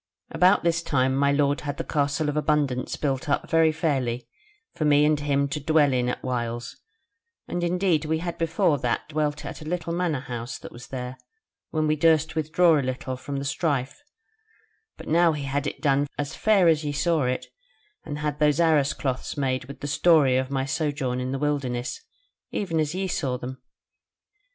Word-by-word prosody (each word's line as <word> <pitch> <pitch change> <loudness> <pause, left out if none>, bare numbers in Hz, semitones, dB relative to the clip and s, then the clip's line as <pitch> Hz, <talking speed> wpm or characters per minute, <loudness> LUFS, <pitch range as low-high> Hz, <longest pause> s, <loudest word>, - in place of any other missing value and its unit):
About 185 +3 +4
this 170 0 +2
time 130 -4 +1
my 140 +1 +3
lord 140 0 +1
had 145 -1 -4
the - - -3
Castle 145 0 0
of 150 - -1
Abundance 150 -4 0
built 135 -1 -2
up 140 - 0
very 165 -1 +4
fairly 130 -7 -1 0.5
for 165 - -3
me 150 0 +5
and 150 -1 +2
him 140 -1 +1
to 150 +1 -3
dwell 150 -1 +3
in 125 -1 +1
at - - -4
whiles; 120 -2 -3 0.7
and 175 - -3
indeed 175 -3 +1
we 160 +1 0
had 170 +1 -4
before 160 -2 +1
that 120 -1 -1
dwelt 150 -1 -1
at - - -7
a 155 - -6
little 170 -1 -2
manor 170 -6 0
house 120 -2 -5
that - - -10
was 120 - -11
there, 125 -1 -6 0.5
when 155 -1 0
we 155 0 +2
durst 160 0 +3
withdraw 160 +1 +3
a - - +1
little 130 0 -3
from 140 +2 -5
the 140 - -4
strife; 140 - -1 1.0
but - - -11
now 165 +1 +4
he 150 -2 -4
had 140 +1 -1
it 140 - -5
done 140 0 +2
as 140 -2 -3
fair 200 -2 +4
as 160 -2 +3
ye 145 - -2
saw 160 0 +1
it, 125 0 -1 0.6
and 145 - -5
had 150 -1 -3
those 150 0 +3
arras 155 -4 +3
cloths 130 +2 -3
made 130 -2 -1
with 140 - -11
the 145 - -3
story 145 -3 +4
of 130 0 0
my 135 -1 -1
sojourn 140 -3 -1
in 130 +1 -3
the 135 - -1
wilderness, 135 - -2 0.5
even 165 -6 -2
as 155 +2 -1
ye 190 +1 -1
saw 135 -8 -1
them. 130 +1 -7
145 Hz, 195 wpm, -25 LUFS, 130-160 Hz, 1.0 s, me